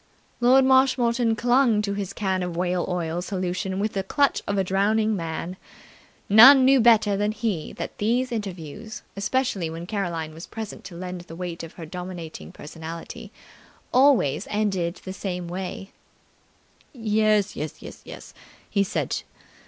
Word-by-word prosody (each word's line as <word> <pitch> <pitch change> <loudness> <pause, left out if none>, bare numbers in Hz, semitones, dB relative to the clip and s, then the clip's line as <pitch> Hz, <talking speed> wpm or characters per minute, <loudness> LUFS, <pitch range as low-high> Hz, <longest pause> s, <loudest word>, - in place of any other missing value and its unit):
Lord 255 +2 +5
Marshmoreton 250 -3 +3
clung 240 -2 +3
to 200 -1 -1
his 200 -2 -4
can 190 -2 -1
of 180 -2 -4
whale 180 0 0
oil 175 -1 -2
solution 185 0 -3
with 210 +1 -1
the 195 - -1
clutch 280 +9 +1
of 200 - -1
a 195 - +2
drowning 215 +3 +1
man. 170 +1 -4 0.7
None 255 +6 +9
knew 270 0 +6
better 225 -3 +5
than 205 +1 0
he 215 -7 -3
that - - -7
these 245 +5 +1
interviews, 210 0 -6
especially 200 -3 -1
when 165 +1 -6
Caroline 170 -6 -3
was 165 +2 -10
present 220 -2 -7
to 175 - -9
lend 180 0 -6
the 170 -1 -11
weight 175 -1 -5
of 165 - -9
her 165 - -9
dominating 170 - -7
personality, 165 +2 -9 0.6
always 255 - +4
ended 195 -5 -1
in - - -17
the 190 - -5
same 180 -3 -4
way. 185 +2 -6 1.0
"Yes, 215 -4 +1
yes, 150 0 -4 0.3
yes!" - - -11 0.3
he 200 -1 +1
said. 195 - -2
195 Hz, 150 wpm, -24 LUFS, 175-220 Hz, 1.0 s, None